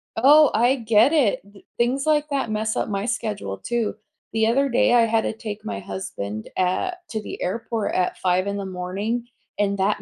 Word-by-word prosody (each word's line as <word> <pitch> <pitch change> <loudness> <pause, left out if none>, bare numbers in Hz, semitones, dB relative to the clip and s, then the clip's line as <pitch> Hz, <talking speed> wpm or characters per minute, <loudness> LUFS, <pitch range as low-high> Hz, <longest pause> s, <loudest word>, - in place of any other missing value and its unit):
Oh, 290 +5 +6
I 245 +4 +3
get 230 +2 +4
it, 280 -10 +2
th 200 - -18
things 255 +4 +1
like 300 -1 +2
that 270 -6 -1
mess 215 0 -1
up - - -1
my 200 0 -2
schedule 210 - -3
too. 235 -3 -2 0.4
The 220 0 +2
other 275 +4 +2
day, 240 0 +3
I 240 - +6
had 225 0 +2
to - - -2
take 215 -1 -7
my 100 -1 -4
husband, 100 +2 -6
uh, 185 - +1 0.2
to 220 -1 -3
the - - -8
airport 225 +3 -2
at 180 -1 0
5:00 185 +1 +1
in 200 0 -2
the 200 - -4
morning, 195 +6 -3 0.3
and 200 -1 +1
that 205 +1 +1
220 Hz, 200 wpm, -23 LUFS, 195-240 Hz, 0.4 s, Oh